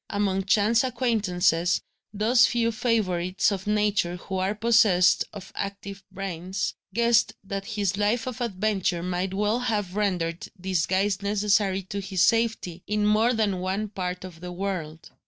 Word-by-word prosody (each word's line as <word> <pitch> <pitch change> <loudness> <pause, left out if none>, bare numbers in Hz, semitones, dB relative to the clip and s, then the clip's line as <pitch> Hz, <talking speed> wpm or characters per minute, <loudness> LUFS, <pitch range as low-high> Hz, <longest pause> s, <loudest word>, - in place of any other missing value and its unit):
Among 195 -2 0
chance 215 +4 +3
acquaintances, 200 -9 +1 0.3
those 220 +4 +4
few 230 -1 +1
favourites 195 -6 0
of 195 0 -4
Nature 210 -4 +1
who 190 +2 -5
are 190 +3 0
possessed 210 -5 +4
of 195 -3 -10
active 200 0 -6
brains, 190 0 -4 0.2
guessed 235 +2 +3
that 195 0 -5
his 200 -3 -1
life 210 +3 +1
of 255 -1 -5
adventure 195 -5 -1
might 180 +1 -2
well 210 +4 +1
have 210 -6 -2
rendered 180 -5 -1
disguise 190 +2 0
necessary 200 -1 +1
to 200 +2 -5
his 190 -1 0
safety, 225 -7 +1
in 210 0 0
more 220 +3 +3
than 205 -4 0
one 190 +3 -2
part 180 -2 -4
of 180 -3 -10
the 180 0 -6
world. 175 -4 -5
200 Hz, 145 wpm, -26 LUFS, 185-215 Hz, 0.3 s, those